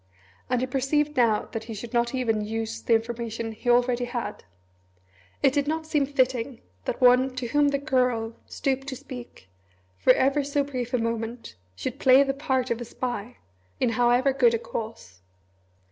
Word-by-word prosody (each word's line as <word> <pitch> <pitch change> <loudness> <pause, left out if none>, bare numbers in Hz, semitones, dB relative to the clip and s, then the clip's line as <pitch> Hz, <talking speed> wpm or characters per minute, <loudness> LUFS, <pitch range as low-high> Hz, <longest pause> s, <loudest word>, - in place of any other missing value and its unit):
And 250 -1 +1
he - - +1
perceived 285 +3 0
now 230 -4 +3
that 225 -1 -5
he 225 -1 -6
should 230 +4 -8
not 235 +1 +1
even 225 -4 0
use 225 +1 -4
the 230 - +3
information 230 0 -3
he 220 +3 -4
already 245 0 +3
had. 240 -1 -5 1.0
It 270 -2 +5
did 285 -1 +1
not 315 +1 -1
seem 295 -3 +1
fitting 260 -2 0 0.2
that - - -2
one 255 +1 +5
to 255 -1 -3
whom 290 +3 +3
the 280 0 +1
Girl 250 -5 0
stooped 270 0 -2
to 270 - -4
speak, 245 - -10 0.5
for - - +6
ever 275 +3 +2
so 285 +1 0
brief 255 -3 -3
a - - +3
moment, 230 - -3 0.2
should 260 - -5
play 265 +1 +7
the 270 -1 -1
part 265 -3 -1
of 235 +1 -1
a - - -4
spy 245 -1 -5 0.4
in 250 - +2
however 245 +3 +3
good 465 - +4
a - - +1
cause. 220 - -7
250 Hz, 175 wpm, -26 LUFS, 230-275 Hz, 1.0 s, play